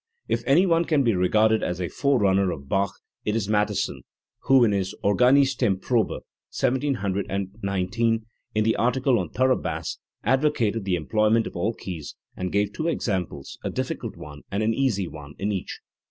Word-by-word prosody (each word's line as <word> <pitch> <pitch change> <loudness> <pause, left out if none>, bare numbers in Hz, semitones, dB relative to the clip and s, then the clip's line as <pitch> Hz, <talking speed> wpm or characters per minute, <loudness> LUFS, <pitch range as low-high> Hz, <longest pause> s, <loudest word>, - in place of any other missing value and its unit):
If - - 0
any 155 +8 +5
one 170 -2 +3
can 150 -4 +2
be 115 -3 +3
regarded 110 +4 +3
as 90 0 -2
a 90 - -1
forerunner 100 - +2
of 70 -5 -6
Bach 95 +2 0 0.2
it 105 - -1
is 110 -4 -1
Mattheson, 105 -1 0 0.4
who, 135 -2 +6
in 110 - +4
his 95 -2 -1
Organistenprobe 125 -2 +2 0.3
(1719), 100 -3 -1 0.3
in 110 - +3
the 110 +1 +2
article 125 0 +2
on 90 -4 -3
thorough 130 0 +2
bass, - - -4 0.2
advocated 115 -5 +1
the 95 -2 +1
employment 110 +7 +2
of - - -7
all 105 +6 -1
keys 85 -6 -7 0.2
and 90 -1 -3
gave 100 0 +1
two 160 - -2
examples, 95 - -3
a - - -1
difficult - - -4
one 75 0 -10
and 100 +2 0
an 110 +1 +2
easy 110 -8 0
one, 75 -3 -10
in 100 +2 -1
each. 95 -3 -4
105 Hz, 165 wpm, -25 LUFS, 95-125 Hz, 0.4 s, who